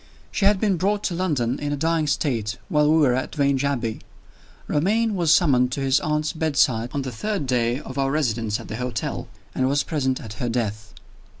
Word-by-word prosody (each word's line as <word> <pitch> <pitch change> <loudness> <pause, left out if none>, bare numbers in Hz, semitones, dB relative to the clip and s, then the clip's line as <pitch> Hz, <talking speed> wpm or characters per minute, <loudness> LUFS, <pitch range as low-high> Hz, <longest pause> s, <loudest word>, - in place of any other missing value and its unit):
She 195 - 0
had 200 -1 +4
been 200 -3 +1
brought 200 +4 0
to 180 - -1
London 145 -9 -1
in 145 0 -3
a 145 - -1
dying 160 +1 +1
state 115 -7 -1
while 150 0 +3
we 160 - +5
were 140 -6 +4
at 130 +4 -3
Vange 140 -2 +2
Abbey. 125 -6 -1 0.7
Romayne 215 +9 +1
was 170 -4 +2
summoned 135 -7 +4
to 140 - -3
his 135 0 +3
aunt's 150 +1 -1
bedside 135 -8 +1
on 140 - -1
the 130 - -4
third 200 - -2
day 125 -1 +1
of 135 -1 -6
our 135 0 +1
residence 115 -7 0
at - - -9
the 110 - -5
hotel, 125 +1 -3 0.3
and 130 0 +1
was 145 +1 +2
present 130 -5 -1
at 110 -2 -8
her 120 - 0
death. 110 -3 -3
140 Hz, 205 wpm, -23 LUFS, 125-160 Hz, 0.7 s, we